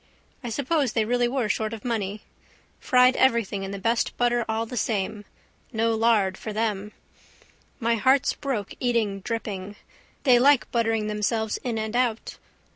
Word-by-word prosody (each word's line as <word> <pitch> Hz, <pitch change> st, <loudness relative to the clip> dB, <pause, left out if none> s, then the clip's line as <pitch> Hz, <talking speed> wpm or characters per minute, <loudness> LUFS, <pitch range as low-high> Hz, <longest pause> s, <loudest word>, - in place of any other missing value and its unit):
I 240 Hz, -, -4 dB
suppose 280 Hz, +1 st, 0 dB
they 220 Hz, -, +1 dB
really 245 Hz, +1 st, +1 dB
were 250 Hz, -2 st, -1 dB
short 215 Hz, +1 st, -1 dB
of 220 Hz, 0 st, -8 dB
money. 210 Hz, -3 st, -2 dB, 0.6 s
Fried 250 Hz, 0 st, +4 dB
everything 230 Hz, -6 st, +2 dB
in 195 Hz, -, -4 dB
the 200 Hz, -, -5 dB
best 230 Hz, +4 st, 0 dB
butter 240 Hz, -1 st, +2 dB
all 220 Hz, +1 st, 0 dB
the 250 Hz, -, -8 dB
same. 210 Hz, -2 st, -2 dB, 0.5 s
No 225 Hz, -1 st, +1 dB
lard 220 Hz, -4 st, +2 dB
for 215 Hz, -, -5 dB
them. 210 Hz, -1 st, -2 dB, 0.9 s
My 235 Hz, -1 st, +1 dB
heart's 260 Hz, +4 st, +3 dB
broke 245 Hz, -9 st, -4 dB
eating 230 Hz, -5 st, 0 dB
dripping. 205 Hz, -2 st, -5 dB, 0.5 s
They 250 Hz, -4 st, +6 dB
like 275 Hz, +1 st, +4 dB
buttering 225 Hz, -2 st, +1 dB
themselves 215 Hz, +1 st, -1 dB
in 240 Hz, -3 st, -3 dB
and 220 Hz, +1 st, -3 dB
out. 240 Hz, -3 st, -1 dB
225 Hz, 155 wpm, -25 LUFS, 210-245 Hz, 0.9 s, They